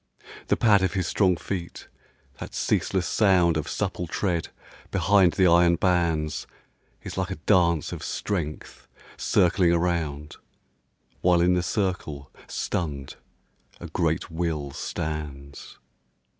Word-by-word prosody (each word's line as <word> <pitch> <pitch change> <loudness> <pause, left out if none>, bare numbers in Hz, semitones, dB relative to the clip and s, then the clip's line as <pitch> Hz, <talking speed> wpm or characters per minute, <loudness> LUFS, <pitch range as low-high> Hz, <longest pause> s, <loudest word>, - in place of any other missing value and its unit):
The - - +2
pad 105 -4 +4
of 95 - 0
his 95 -3 -1
strong 90 +1 +2
feet, 85 +1 -6 0.5
that - - -8
ceaseless 95 -2 0
sound 90 -6 +3
Of 80 0 -2
supple 95 -3 -3
tread 85 -1 -1 0.4
behind 100 -3 +3
the 95 - +3
iron 85 0 +5
bands, 85 -4 0 0.6
Is - - -5
like - - -1
a - - -3
dance 85 -2 +2
of - - -6
strength 85 -7 -4 0.3
circling 90 -1 +2
around, 85 -4 -1 0.8
While 90 -1 +4
in 90 +1 +4
the 90 - +2
circle, 85 -8 -3 0.2
stunned, 70 -6 -4 0.6
a - - -8
great - - -1
will 80 -4 -2
stands. 70 -2 -6
85 Hz, 120 wpm, -25 LUFS, 75-95 Hz, 0.8 s, iron